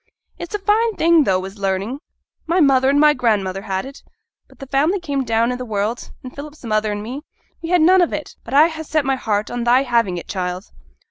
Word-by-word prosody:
'It's 345 +4 -5
a - - +1
fine 425 +2 +1
thing, 330 -2 +4
tho', 185 -1 +1
is 195 +2 -10
learning. 195 +7 -2 0.5
My 340 +3 +2
mother 270 -4 +4
and 285 +1 +3
my 300 0 +6
grandmother 205 -7 0
had 190 +1 -3
it: 275 +1 -11 0.5
but - - -21
th' 275 - -10
family 305 +8 +2
came 285 -6 -2
down 230 0 +1
i' - - -2
the 250 - -6
world, 220 +1 -3
and 255 - -9
Philip's 295 +1 -10
mother 215 -1 0
and 205 0 -4
me, 255 +6 -6 0.4
we 330 - -6
had 355 -2 +3
none 365 +3 +5
of 345 - +1
it; 300 - -6
but 250 - -5
I 300 +3 +7
ha' 320 -1 -7
set 310 -2 -1
my 270 0 +1
heart 215 -4 -2
on 245 -1 -3
thy 245 +3 +4
having 230 -8 +1
it, 170 - -8
child.' 180 0 -4
255 Hz, 230 wpm, -20 LUFS, 210-305 Hz, 0.5 s, I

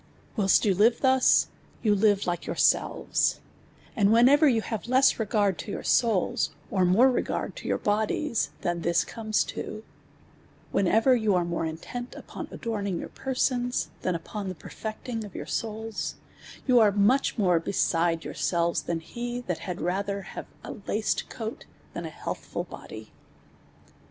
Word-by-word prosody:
Whilst 195 -1 +4
you 200 - +4
live 225 +5 +3
thus, 260 -1 +4 0.4
\un 205 -2 +3
live 205 -2 +3
like 175 -1 -1
\onrsel\es; - - +1 0.6
;iii(l 205 -5 +3
whenever 260 +7 +6
yon 230 -5 +2
have 220 0 -4
less 260 +1 +4
re:; 220 - -1
ard 205 -4 +2
to 205 - -5
your - - -5
siads, 225 -7 +2 0.2
or 190 -2 +2
more 225 +9 +5
re«»ard 250 - -2
to - - -7
your - - +1
bodies, 220 +5 0
than 175 -1 -1
this 170 0 +2
crimes 215 -2 0
to; 215 - -6 0.9
whenever 220 +7 +4
y«>u 215 -5 +2
are 175 -1 +2
nn)re 170 -1 -2
intent 245 +10 -7
upon - - -8
adorninj; 200 -5 -3
your - - -6
persons, 250 -2 -1
than 185 - 0
jipon 190 +2 -5
perieclini;' 220 +3 -6
olvonr - - -7
souls, 220 -1 -3 0.5
yon 250 -3 +5
are 215 -2 +6
much 210 +9 +2
ntor*' 180 -6 +3
be - - -3
side 165 -3 +1
yourselves, 170 -1 0
tlain 165 -1 -2
he, 240 +6 -5
(liat 180 -7 -3
had 180 -3 -5
rather 195 +3 -1
have - - -8 0.2
a - - -6 0.2
laced 215 +1 -1
coat 225 -1 -6 0.3
than - - -5
an - - -8
heat(hrul - - -5
body. - - -10
210 Hz, 155 wpm, -27 LUFS, 185-235 Hz, 0.9 s, whenever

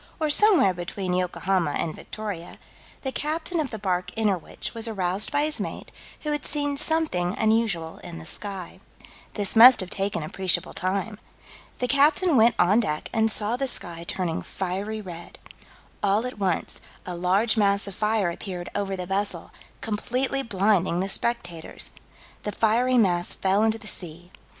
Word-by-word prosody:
or 310 -2 +1
somewhere 335 - +5
between 180 +1 -4
Yokohama 180 -2 0
and 160 - -2
Victoria, 205 -6 -7 0.5
the 265 - -2
captain 320 +5 -2
of 295 -4 -1
the 220 - -5
bark 180 -3 -1
Innerwich 205 -6 -1
was 230 0 -2
aroused 195 -2 -1
by 290 0 +2
his 305 0 +2
mate, - - -5 0.3
who 300 - -2
had 295 -2 -2
seen 290 -1 +1
something 280 - 0
unusual 220 -7 0
in 170 - -9
the 160 - -9
sky. 195 -1 -4 0.6
This 205 -1 0
must 245 +3 +9
have 185 -1 -4
taken 195 -2 -1
appreciable 185 +3 -1
time. 200 +3 -2 0.6
The 250 - -1
captain 295 +5 +3
went 230 0 +5
on 200 +6 +4
deck 155 -10 -2
and 220 -1 +2
saw 215 +2 +2
the 270 +1 -1
sky 170 -8 -4
turning 175 -4 -2
fiery 195 +4 -4
red. 175 -3 -9 0.6
"All 205 +3 +2
at 250 -4 -6
once, 185 -4 -1 0.2
a 180 - -4
large 190 +7 +2
mass 200 -2 +3
of 200 - -6
fire 210 -3 0
appeared 180 0 -6
over 195 -1 -2
the 180 -1 -5
vessel, 195 +2 -1 0.3
completely 250 +5 -1
blinding 195 -6 +1
the 190 +1 -1
spectators." 190 -7 -1 0.5
The 210 - -3
fiery 235 +5 +2
mass 175 -6 +2
fell 195 +2 +1
into 220 0 +2
the 225 - -15
sea. 175 -3 -5
205 Hz, 160 wpm, -25 LUFS, 180-235 Hz, 0.6 s, must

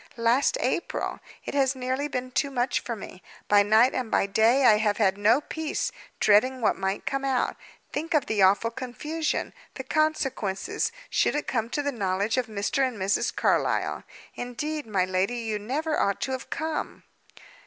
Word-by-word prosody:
Last 235 - +2
April! - - -2 0.3
It - - -5
has 275 -1 +2
nearly 260 +3 -2
been 255 -2 -4
too 280 +2 0
much 250 -1 0
for 235 - -5
me. 190 -3 -10 0.3
By 205 0 +6
night 220 +5 +4
and 250 -3 -2
by - - +2
day 225 +7 +3
I 215 -3 +7
have 210 -1 +1
had 195 -3 +3
no 215 +7 +3
peace, 315 0 -3 0.3
dreading 255 +6 +4
what 230 - +2
might 190 +1 -3
come 275 0 -2
out. 265 -2 0 0.4
Think 320 +3 -2
of 295 - +3
the 215 -2 0
awful 200 +4 +4
confusion, 300 +6 -3 0.2
the - - -5
consequences, 310 - -1 0.2
should - - +2
it 295 - -1
come 230 -2 -1
to 290 +3 -2
the 285 - 0
knowledge 200 0 -1
of 250 -2 0
Mr. 210 +4 -2
and 255 -4 -1
Mrs. 195 +1 0
Carlyle. - - +1 0.3
Indeed, 295 +4 -4
my 195 -4 +1
lady, 185 +6 0
you 220 -3 -2
never 300 +9 -1
ought 200 -1 +1
to 265 - -2
have 260 0 -5
come." 315 -1 -4
245 Hz, 175 wpm, -26 LUFS, 210-275 Hz, 0.4 s, I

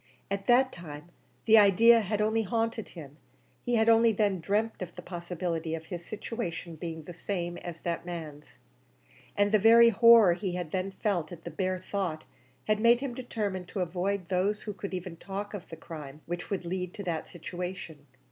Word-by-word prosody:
At 200 0 -3
that 255 +2 +5
time 155 -1 -10 0.4
the 220 0 +8
idea 225 +4 +6
had 210 +1 -1
only 220 +1 +2
haunted 225 +1 -2
him; 145 -2 -10 0.5
he 245 - 0
had 220 0 +3
only 230 0 +6
then 200 -3 +1
dreamt 210 +6 -1
of 175 -2 -6
the - - -8
possibility 170 -2 -3
of 160 0 -8
his 175 0 -6
situation 180 -5 -5
being 160 0 -6
the 175 - -9
same 175 -1 -4
as 170 -2 -8
that 170 -1 -3
man's, 160 -4 -8 0.8
and 205 0 +3
the 215 - +5
very 230 +3 +7
horror 230 -3 +7
he 185 0 -3
had 175 -4 -4
then 190 0 -1
felt 190 -3 -2
at 170 -2 -10
the - - -6
bare 185 -1 -1
thought 185 -4 -3 0.4
had 215 0 +1
made 235 +2 +5
him 275 -3 -3
determined 210 -7 -4
to 190 - -4
avoid 180 +1 -2
those 195 +3 0
who 210 - -5
could 195 0 -5
even 180 -2 -6
talk 200 +4 -6
of 200 -4 -7
the 165 - -7
crime 150 -3 -9
which 175 +1 -5
would 195 -3 -3
lead 180 +1 -4
to 200 - -6
that 170 -4 -3
situation. 175 -3 -7
185 Hz, 190 wpm, -29 LUFS, 170-215 Hz, 0.8 s, the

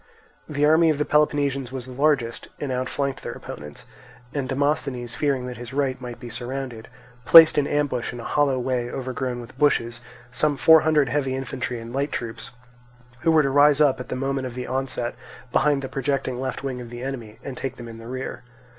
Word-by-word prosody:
The 145 -1 +1
army 160 +2 +5
of 155 - +2
the 150 - 0
Peloponnesians 140 -4 +1
was 130 -2 -5
the 130 - -10
largest 135 -3 0
and 145 -3 -3
outflanked 130 +2 -2
their - - -5
opponents; 75 0 -9 0.5
and 140 -3 -2
Demosthenes 135 -3 -1
fearing 135 -3 0
that 125 -1 -6
his 120 +1 -9
right 135 -2 -1
might 120 -2 -7
be 120 - -8
surrounded, 120 -1 -5 0.4
placed 165 +3 +9
in 145 -1 +2
ambush 145 -5 -1
in 120 - -8
a - - -7
hollow 140 -1 +1
way 125 -1 -1
overgrown 130 -1 -3
with 120 +2 -12
bushes 120 -5 +2 0.3
some 145 +3 0
four 160 +3 +7
hundred 150 -4 +3
heavy 135 -1 0
infantry 125 -2 -4
and 115 +1 -9
light 140 +2 -1
troops, 115 -1 -5 0.7
who 165 - +1
were 155 -1 +5
to 135 - 0
rise 145 +1 +5
up 145 -4 +4
at 125 - -7
the - - -2
moment 135 0 -2
of 120 - -9
the 125 0 -4
onset 130 -2 -2 0.4
behind 145 0 +2
the - - -3
projecting 135 -2 -2
left 130 +1 -4
wing 130 -2 -3
of 120 - -9
the 120 +1 -7
enemy, 120 -5 -6
and 135 - -6
to - - -9
take 135 -2 -3
them 120 -2 -9
in 115 0 -9
the 115 - -10
rear. 130 -1 -5
130 Hz, 210 wpm, -24 LUFS, 120-145 Hz, 0.7 s, placed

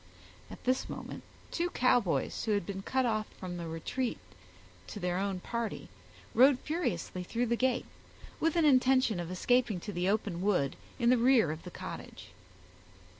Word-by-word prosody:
At - - -11
this 255 +1 0
moment - - -6 0.3
two 345 +1 0
Cowboys, 235 - +1
who 220 - +2
had 205 -4 0
been 195 +1 -5
cut 260 +5 0
off 215 -2 0
from 175 -2 -5
a 170 - -5
retreat 230 +10 -2 0.7
to - - -7
their 180 -1 -1
own 195 -1 -1
party, 235 0 -4 0.4
rode 260 +3 +6
furiously 280 - -2
through 230 +7 -1
the 235 0 +1
gate, 255 +1 +1 0.5
with 325 0 +1
an 335 -2 +4
intention 255 -6 +4
of 170 -1 -4
escaping 220 +2 +2
to 205 - -6
the 180 +1 0
open 200 -4 -1
wood 180 -9 +1 0.2
in 235 -1 +3
the 250 - +4
rear 240 - +5
of 155 +1 -6
the - - -5
cottage. - - -8
220 Hz, 170 wpm, -31 LUFS, 180-255 Hz, 0.7 s, rode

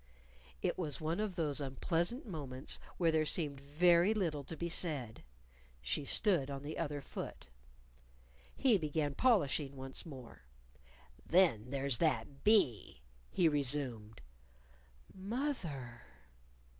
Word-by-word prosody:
It - - 0
was 150 -6 -2
one 160 +4 -1
of 210 -4 -2
those 150 -4 -1
unpleasant 170 - 0
moments 140 - -5 0.2
when 170 -2 +3
there 160 -1 +3
seemed 150 -3 0
very 170 +7 +4
little 160 -8 -1
to 165 - -7
be 170 - -2
said. 145 -10 -1 0.6
She 65 - -1
stood 170 -5 +3
on 140 0 -5
the 150 +2 -5
other 145 -3 -2
foot. - - -7 1.1
He 245 -7 +4
began 150 -2 -1
polishing 145 - +2
once 135 0 -6
more. 130 -7 -11 0.8
"Then 145 - +3
there's 135 -3 0
that 140 -2 0
bee," 125 - +2 0.3
he 175 - +3
resumed 130 - -1 0.9
"Moth 240 +8 -2
er." 125 -6 -7
150 Hz, 120 wpm, -35 LUFS, 135-175 Hz, 1.1 s, very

